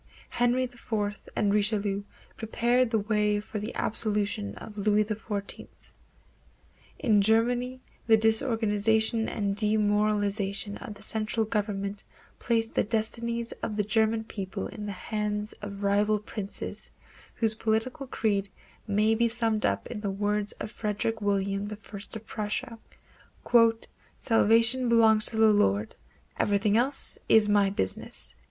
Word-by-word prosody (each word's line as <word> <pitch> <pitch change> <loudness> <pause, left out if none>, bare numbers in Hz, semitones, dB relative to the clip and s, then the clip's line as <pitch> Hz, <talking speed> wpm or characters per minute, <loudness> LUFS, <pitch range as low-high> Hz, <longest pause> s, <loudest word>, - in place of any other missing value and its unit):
Henry 245 +1 +1
IV 220 -4 -3 0.2
and 205 -1 +1
Richelieu 205 -1 +1 0.3
prepared 240 +2 +1
the 225 - +1
way 210 0 +1
for 210 +1 -6
the 215 +4 -6
absolutism 205 - -1
of 215 - -10
Louis 210 +1 +2
XIV. 205 -1 -5 1.3
In 215 -5 +3
Germany 245 +4 +1 0.3
the 220 -1 +6
disorganization 220 0 +2
and 200 -2 -2
demoralization 205 -1 0
of 210 - -8
the 205 - -13
central 220 +1 0
government 205 -2 -3 0.4
placed 225 -1 0
the - - +2
destinies 230 +2 -2
of 215 - -3
the 210 - +1
German 220 +2 +1
people 195 -3 -5
in 210 -2 -7
the - - -3
hands 210 +1 -3
of 200 -1 -7
rival 205 +2 +2
princes, 210 -1 -5 0.5
whose 225 -2 +1
political 225 +6 -2
creed 200 -5 -1 0.4
may 215 +2 +2
be 235 +1 +2
summed 225 -2 0
up - - -2
in 230 -3 -6
the 205 - -2
words 205 +1 0
of - - -7
Frederick 220 0 -2
William 200 0 0
I 210 - -5
of 205 +1 -9
Prussia, 220 +3 -4 1.4
"Salvation 230 +2 +4
belongs 220 -2 +5
to 220 - 0
the 220 -1 +6
Lord; 105 - +1 0.5
everything 205 0 +2
else 260 +5 +1
is 220 -1 +6
my 205 -1 +3
business." 95 - +2
215 Hz, 130 wpm, -28 LUFS, 205-225 Hz, 1.4 s, the